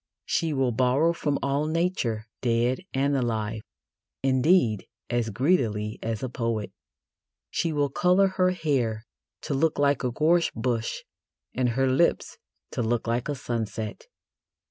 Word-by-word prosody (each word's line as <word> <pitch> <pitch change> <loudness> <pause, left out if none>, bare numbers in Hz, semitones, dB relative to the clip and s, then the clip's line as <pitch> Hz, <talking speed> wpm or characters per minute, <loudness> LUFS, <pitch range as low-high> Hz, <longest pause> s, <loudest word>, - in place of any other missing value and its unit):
She 165 -1 0
will 135 -3 +1
borrow 130 +8 +2
from 145 -4 -1
all 140 +2 0
Nature, 155 - -1 0.2
dead 120 +1 +1
and 140 +1 +1
alive, 110 -4 -1 0.6
indeed, 130 - +3 0.2
as 120 -2 0
greedily 110 - 0
as 110 0 -3
a - - 0
poet. 115 -4 -2 0.8
She 165 - 0
will 145 -2 0
colour 180 +5 +4
her 185 -1 +2
hair 130 -11 -1 0.4
to - - -2
look 155 +3 +1
like 140 -1 +2
a 125 - +1
gorse 165 +6 +3
bush 115 0 -2 0.5
and 125 -1 +1
her 135 - +3
lips 135 +7 +1 0.3
to - - -2
look 120 0 0
like 120 +4 -1
a 145 - -1
sunset. 115 - -4
130 Hz, 140 wpm, -26 LUFS, 115-150 Hz, 0.8 s, colour